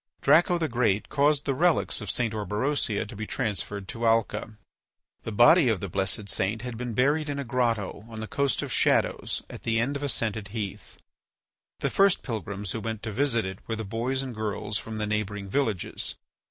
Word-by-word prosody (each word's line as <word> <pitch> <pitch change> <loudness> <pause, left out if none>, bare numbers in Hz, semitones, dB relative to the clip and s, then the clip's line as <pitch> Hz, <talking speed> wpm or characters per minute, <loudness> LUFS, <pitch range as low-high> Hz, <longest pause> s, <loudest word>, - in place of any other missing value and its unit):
Draco 175 +2 +5
the 165 -2 0
Great 115 -5 +1
caused 145 0 +2
the 140 - +1
relics 165 -2 +2
of 105 - -5
St. 115 0 0
Orberosia 105 +1 -1
to 105 - -9
be 110 +1 -5
transferred 105 -4 -2
to 115 0 -1
Alca. 110 -1 +1 0.7
The 115 - -3
body 120 - +6
of 110 -4 +1
the 100 - -4
blessed 95 +3 -1
saint 105 +4 -1
had 125 -2 -4
been 120 -1 -4
buried 145 +5 +2
in 145 - -2
a 140 - -2
grotto 115 -5 -1
on 110 -1 -7
the 110 - -3
Coast 140 +4 0
of - - -5
Shadows - - +1
at - - -9
the 115 -1 +1
end 130 +5 0
of 140 - -3
a 145 - -1
scented 110 -4 -1
heath. 105 -2 -6 0.8
The - - 0
first 195 -1 +4
pilgrims 105 -5 -4
who 115 - -2
went 110 0 -4
to 110 - -3
visit 120 -2 +1
it 95 0 -5
were 115 - -1
the 110 0 -4
boys 120 +6 -1
and 130 -2 -5
girls 105 -1 -2
from 110 - -7
the 105 - -1
neighbouring 105 -1 -2
villages. 110 -4 -1
115 Hz, 200 wpm, -27 LUFS, 105-130 Hz, 0.8 s, body